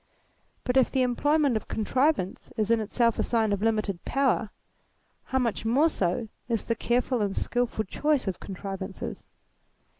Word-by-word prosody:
But 250 +1 +1
if 260 - +5
the 260 -2 +1
employment 285 +2 +2
of 220 - -3
contrivance 255 - 0
is 215 0 +1
in 230 - +4
itself 230 +2 +1
a - - +3
sign 220 -3 +1
of 200 - -2
limited 215 -5 0
power, 265 -5 +1 0.8
how 265 - -1
much 235 -5 0
more 265 +9 +4
so 205 - -1 0.2
is 230 -2 0
the 230 - 0
careful 240 +1 0
and 200 -1 -1
skilful 245 -3 0
choice 295 +5 0
of 185 - -2
contrivances? 195 0 -6
230 Hz, 155 wpm, -27 LUFS, 205-255 Hz, 0.8 s, if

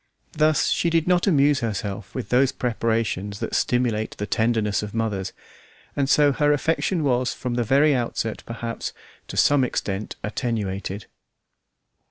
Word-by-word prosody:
Thus 155 -1 +2
she 170 - +1
did 165 -1 +1
not 180 0 +3
amuse 145 -5 +4
herself 100 -3 -4
with 130 - -4
those 130 +2 +3
preparations 110 -4 -1
that - - -4
stimulate 120 -3 0
the 105 - -3
tenderness 110 -2 +1
of 105 +1 -6
mothers, 100 -4 -2 0.6
and 140 -1 0
so 145 -1 +5
her 145 +2 +2
affection 160 +3 0
was 125 -2 +1
from 125 -1 -4
the 120 0 0
very 140 +6 +4
outset, 115 -3 -2
perhaps, 115 0 -5 0.3
to - - -7
some 145 -2 +4
extent 105 -4 -3
attenuated. 100 -3 -3
120 Hz, 145 wpm, -23 LUFS, 105-140 Hz, 0.6 s, so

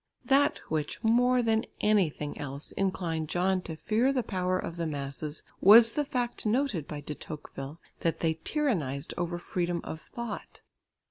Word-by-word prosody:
That 280 +1 +4
which 155 +6 -2
more 245 +2 +4
than 225 +1 +1
anything 180 -8 +1
else 140 0 -4
inclined 170 -5 -1
John 185 +2 +1
to 165 -2 -6
fear 225 +10 +1
the 260 -3 0
power 185 -2 0
of 170 - -4
the 165 -1 -1
masses, 145 +1 -3 0.2
was 225 +4 +9
the 295 - 0
fact 245 -3 -2
noted 220 - 0
by 150 -1 -6
De 150 +1 -5
Tocqueville 150 0 -8 0.2
that 165 - 0
they 160 -1 +2
tyrannised 165 - -1
over 175 0 -2
freedom 175 0 -2
of 160 - -6
thought. 235 -3 -7
180 Hz, 155 wpm, -29 LUFS, 155-230 Hz, 0.2 s, was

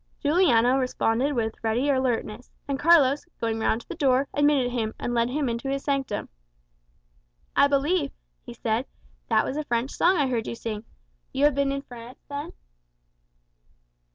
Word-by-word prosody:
Juliano 270 -6 +3
responded 255 +1 0
with 225 -3 -3
ready 230 +5 +1
alertness; 250 -4 -1 0.2
and 275 -1 -2
Carlos, 290 -4 +5 0.2
going 225 -1 -1
round 220 +1 +1
to - - -21
the - - -5
door, 270 -1 +2
admitted 290 -4 +2
him, 225 -3 -2
and 240 - -3
led 235 0 +1
him 285 +1 -1
into 235 +3 -3
his 275 0 -2
sanctum. 270 -7 -2 1.3
"I 280 - +6
believe," 285 +2 +1 0.3
he 240 - -10
said, 230 +2 -1 0.4
"that - - +3
was 275 - -3
a 305 - -1
French 240 -1 -1
song 365 +2 +3
I 290 - +2
heard 240 -4 -1
you - - -4
sing. 220 -1 -5 0.5
You 280 - +2
have 295 - +4
been 280 0 +1
in 275 0 -3
France, 240 -1 -11
then?" 290 +3 -6
260 Hz, 165 wpm, -25 LUFS, 235-285 Hz, 1.3 s, I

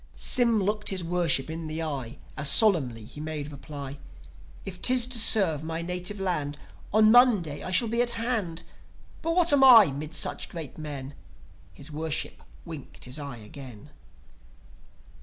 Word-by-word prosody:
Sym 235 -5 +2
looked 210 +2 -1
his 190 -2 -2
Worship 170 -5 +1
in 160 0 -6
the 155 +1 -4
eye, 140 -4 -5 0.2
As 150 -1 0
solemnly 135 - +3
he 145 +6 -10
made 150 -1 -5
reply: 140 -1 -9 0.7
"If 180 -2 -8
'tis 255 -1 +4
to 250 -1 0
serve 185 -9 +3
my 165 +1 -4
native 180 +3 -5
land, 150 -7 -2 0.3
On 215 +1 +5
Monday 215 - +4
I - - -6
shall 210 +6 +2
be 235 +2 0
at 240 0 +2
hand. 220 -8 -2 0.6
But 330 +1 -2
what 345 -4 +5
am 275 -1 +4
I 225 - +8
'mid 150 +4 -6
such - - -2
great 160 -5 -8
men?" 145 -3 -7 0.6
His 145 - -12
Worship 155 0 -4 0.2
winked 160 -6 -9
his 125 +4 -6
eye 140 -4 -7
again 125 +4 -12
165 Hz, 160 wpm, -26 LUFS, 145-215 Hz, 0.7 s, I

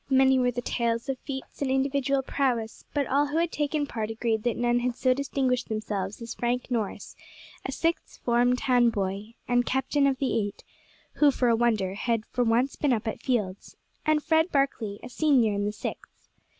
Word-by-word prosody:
Many 265 -1 +5
were 250 -1 +3
the 245 0 -3
tales 230 +1 -1
of 265 -1 -2
feats 265 0 -7
of 280 - +1
individual 275 0 +1
prowess; 245 -5 -1
but 285 -1 0
all 285 +3 +2
who 295 +3 -2
had 335 0 +1
taken 295 0 0
part 220 -5 -4
agreed 225 0 -1
that 240 0 -1
none 240 0 +2
had 245 0 -1
so 255 0 +3
distinguished 260 -2 -1
themselves 210 -2 -3
as 230 0 -5
Frank 245 +2 -2
Norris, 225 -4 -3 0.5
a - - -3
Sixth 335 +1 -2
Form 245 +1 +3
town 245 -2 +3
boy, 205 +1 -3
and 245 0 +3
captain 265 +3 +1
of 270 -1 +1
the 260 -4 0
eight 205 -2 -4 0.5
who, 295 - +6
for 255 -3 +1
a 230 - +4
wonder 220 -5 +1
had 225 +2 -1
for 245 - +1
once 240 +4 +2
been 285 -4 +1
up 225 -1 -2
at 220 - -3
fields 210 -7 -2 0.3
and 305 -1 +2
Fred 320 +2 +2
Barkley, 240 -7 0
a - - -6
senior 250 -5 +3
in 205 0 -1
the 205 - 0
Sixth. 210 - -8
245 Hz, 195 wpm, -27 LUFS, 225-275 Hz, 0.5 s, who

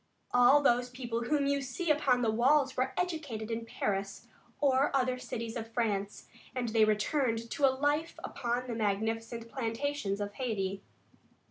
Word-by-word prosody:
All 245 +4 +6
those 245 -1 +3
people 240 -2 -4
whom 290 +2 +1
you 280 0 +1
see 275 +6 -1
upon 265 -4 +2
the 225 - +2
walls 265 +4 +3
were 255 - 0
educated 290 -11 -3
in 230 0 -3
Paris 195 -3 -3 0.3
or 275 -1 +3
other 255 -1 +1
cities 230 -2 -5
of 225 -1 -5
France, 205 -4 -1 0.3
and 245 -2 -1
they 220 -1 +4
returned 230 +2 0
to 285 - +2
a 265 - +1
life 295 +4 0
upon 245 -1 -2
the 245 - -4
magnificent 225 +2 -2
plantations 230 -3 -2
of 205 0 -3
Hayti. 195 -6 -2
240 Hz, 155 wpm, -31 LUFS, 225-275 Hz, 0.3 s, All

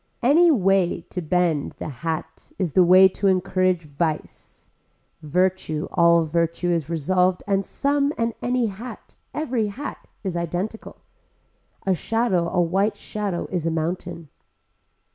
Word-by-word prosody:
Any 325 +8 +6
way 195 - +2
to 180 - -3
bend 170 -3 0
the - - -5
hat 160 +4 -5
is 180 -7 -2
the 185 - +6
way 185 +2 +8
to 200 +2 -1
encourage 185 -1 +1
vice. 155 +1 -4 0.6
Virtue 160 -1 0
all 170 -1 +4
virtue 170 +2 0
is 165 -3 -1
resolved 180 +3 +1
and 195 -1 +1
some 280 +5 0
and 230 0 0
any 250 0 +1
hat, 220 +4 -8 0.2
every 250 -8 -1
hat 260 +9 -7 0.2
is 190 -3 -3
identical. 175 +6 -4 0.8
A 190 - +3
shadow 190 -3 0
a 180 - 0
white 195 +5 +1
shadow 205 -3 -4
is 175 -3 -1
a - - +3
mountain. 165 -1 -3
185 Hz, 135 wpm, -23 LUFS, 170-205 Hz, 0.8 s, way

